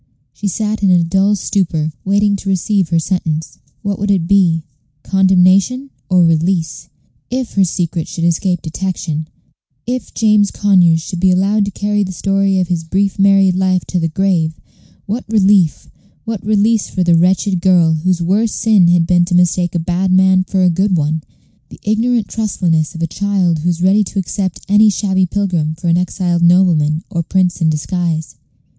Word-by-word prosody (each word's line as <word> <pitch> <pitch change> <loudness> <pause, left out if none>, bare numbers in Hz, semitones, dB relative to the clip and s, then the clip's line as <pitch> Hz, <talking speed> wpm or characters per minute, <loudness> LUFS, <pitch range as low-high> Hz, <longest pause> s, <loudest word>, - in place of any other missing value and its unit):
She 205 - -5
sat 215 +2 -2
in 195 - +2
a 175 -2 +4
dull 195 +4 +1
stupor, 165 -6 -2
waiting 200 +1 +1
to 195 - -6
receive 190 -1 0
her 170 - +1
sentence. 160 -2 -3 0.2
What 200 -1 -3
would 205 +1 -2
it 190 -4 +1
be? 170 -4 +2 0.4
Condemnation 190 +7 +2 0.2
or 180 -2 +4
release? 165 +1 -1 0.4
If 255 -1 -4
her 195 - +2
secret 170 -2 -2
should 165 - -5
escape 170 +1 0
detection 160 -2 -4 0.6
if 245 -2 -4
James 210 -2 +2
Conyers 180 -5 +2
should 175 +2 -6
be 190 +1 +3
allowed 200 +3 +1
to - - -3
carry 205 +1 -1
the 190 - -5
story 195 0 0
of 180 - -1
his 170 -2 -2
brief 195 +4 -1
married 195 -1 +4
life 185 -1 0
to 180 - -1
the 165 - 0
grave, 165 -2 -1 0.5
what 225 +5 -4
relief, 200 -6 +2 0.4
what 225 -4 -5
release 215 +1 +1
for 185 - -1
the 175 -1 +2
wretched 185 +2 +1
girl, 175 -3 +3
whose 175 +2 -1
worst 205 +6 0
sin 210 -6 +3
had 175 -1 +3
been 175 0 +3
to 175 0 -1
mistake 175 0 +1
a - - +1
bad 180 +3 -1
man 185 0 +3
for 190 0 -1
a 180 - +3
good 190 +2 0
one 155 +1 -1 0.5
the - - -14
ignorant 225 +1 0
trustfulness 175 -6 -1
of 165 - -4
a 165 - -4
child 190 -5 +1
who 170 +4 -1
is 175 0 -2
ready 200 +3 +3
to 200 - -8
accept 190 -1 -3
any 210 +2 +4
shabby 190 -2 0
pilgrim 175 -5 -2
for 170 +2 -3
an 170 - +3
exiled 180 -1 -1
nobleman 170 -3 +2
or 170 - -3
a - - 0
prince 180 0 -1
in 160 - +2
disguise. 160 +1 -3
185 Hz, 180 wpm, -15 LUFS, 170-200 Hz, 0.6 s, a